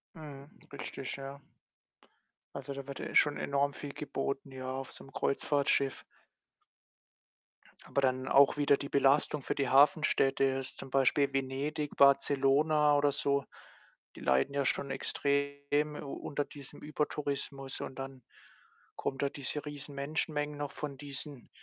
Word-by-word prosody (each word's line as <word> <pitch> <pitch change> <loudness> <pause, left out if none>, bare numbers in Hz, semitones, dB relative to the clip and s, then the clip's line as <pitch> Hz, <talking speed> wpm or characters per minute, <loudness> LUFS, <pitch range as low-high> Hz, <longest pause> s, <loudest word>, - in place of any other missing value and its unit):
Mhm, 145 -2 -10 0.2
richtig, 135 -1 -5
ja. 135 +1 -8 1.1
Also, 140 0 -5
da 140 0 -7
wird 140 - -6
ja - - -4
eh - - -8
schon 145 -1 +5
enorm 140 0 0
viel 145 -1 -7
geboten, 140 -1 -3
ja, 130 0 -5
auf 135 0 -5
so - - -12
'nem 135 - -14
Kreuzfahrtschiff. 140 -1 +1 1.8
Aber 140 - -1
dann 130 0 +1
auch 140 +1 +6
wieder 145 -1 +4
die 140 - -6
Belastung 140 +1 +3
für - - -2
die 140 -3 0
Hafenstädte, 140 -2 +4
jetzt 135 -1 -1
zum 135 - -8
Beispiel 135 +1 +3
Venedig, 140 +3 -2
Barcelona 145 +2 +4
oder 145 0 +3
so, 140 0 0 0.7
die - - -10
leiden 65 - +2
ja 140 -1 +1
schon 140 - 0
extrem 140 +2 0
u 140 -2 -6
unter 145 0 -2
diesem 140 -3 -12
Übertourismus 140 -2 -3
und 130 - -6
dann 135 -2 -7 0.7
kommen 135 0 -3
da 140 - +1
diese 145 +1 -4
riesen 145 -1 -7
Menschenmengen 150 +1 -2
noch 145 -1 -3
von 145 -2 -5
diesen 140 -2 -8
140 Hz, 145 wpm, -32 LUFS, 135-145 Hz, 1.8 s, auch